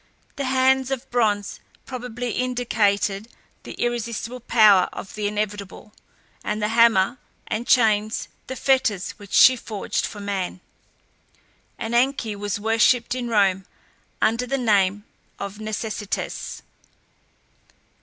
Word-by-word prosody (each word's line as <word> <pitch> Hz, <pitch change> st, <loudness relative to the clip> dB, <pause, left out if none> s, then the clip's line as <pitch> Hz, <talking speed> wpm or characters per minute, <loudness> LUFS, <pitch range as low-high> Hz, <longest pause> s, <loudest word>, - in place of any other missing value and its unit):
The 280 Hz, -, -3 dB
hands 260 Hz, 0 st, +2 dB
of 270 Hz, -2 st, -3 dB
bronze 210 Hz, -4 st, 0 dB, 0.3 s
probably 245 Hz, -2 st, -5 dB
indicated 215 Hz, -5 st, 0 dB, 0.3 s
the -, -, -9 dB
irresistible 240 Hz, 0 st, -3 dB
power 215 Hz, -6 st, +5 dB
of 195 Hz, -, -8 dB
the 210 Hz, -1 st, -2 dB
inevitable, 205 Hz, 0 st, -4 dB, 0.5 s
and 210 Hz, 0 st, -2 dB
the 210 Hz, 0 st, 0 dB
hammer 230 Hz, 0 st, +4 dB, 0.3 s
and 235 Hz, +3 st, -3 dB
chains 215 Hz, -3 st, +2 dB, 0.2 s
the 260 Hz, -, -5 dB
fetters 235 Hz, -8 st, +1 dB
which 200 Hz, -1 st, -13 dB
she 260 Hz, -, +7 dB
forged 215 Hz, -4 st, -3 dB
for 210 Hz, -, -9 dB
man. 195 Hz, -3 st, -3 dB, 1.2 s
Ananke 235 Hz, -1 st, 0 dB
was 205 Hz, -1 st, -3 dB
worshipped 225 Hz, +3 st, +2 dB
in 250 Hz, -1 st, -3 dB
Rome 195 Hz, -4 st, +2 dB, 0.5 s
under 230 Hz, +3 st, +1 dB
the 275 Hz, -, 0 dB
name 205 Hz, -4 st, +2 dB, 0.3 s
of 200 Hz, +1 st, -6 dB
Necessitas. 215 Hz, -1 st, -4 dB
220 Hz, 115 wpm, -23 LUFS, 205-245 Hz, 1.2 s, she